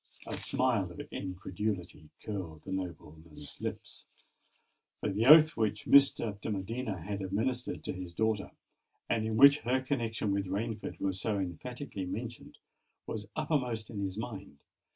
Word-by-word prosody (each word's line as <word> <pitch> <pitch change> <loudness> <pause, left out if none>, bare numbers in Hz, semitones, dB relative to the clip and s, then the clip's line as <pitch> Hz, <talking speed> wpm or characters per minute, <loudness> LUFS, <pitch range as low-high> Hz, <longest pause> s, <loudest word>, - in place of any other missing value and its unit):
A - - -5
smile 120 -8 +1
of 85 - -11
incredulity 90 -3 -4
curled 90 -7 -5
the 95 - -7
nobleman's 80 -5 -7
lip—for - - -9
the 110 +5 +1
oath 155 +1 +9
which 105 -2 0
Mr. 115 -7 +5
de - - -3
Medina 105 0 -3
had 100 +1 -3
administered 115 +7 -2
to - - -3
his 90 -1 -6
daughter, 110 +2 0 0.6
and 110 -1 +1
in 110 0 -1
which 140 +3 +9
her 130 +2 +1
connexion 115 -6 -1
with 100 -1 -1
Rainford 105 +4 -3
was 95 -1 -1
so 105 -2 0
emphatically 100 - -4
mentioned, 115 +5 -6 0.5
was 105 -2 -5
uppermost 125 -8 -1
in 105 - -5
his 95 0 -3
mind. 100 -9 -6
105 Hz, 140 wpm, -32 LUFS, 95-120 Hz, 0.6 s, oath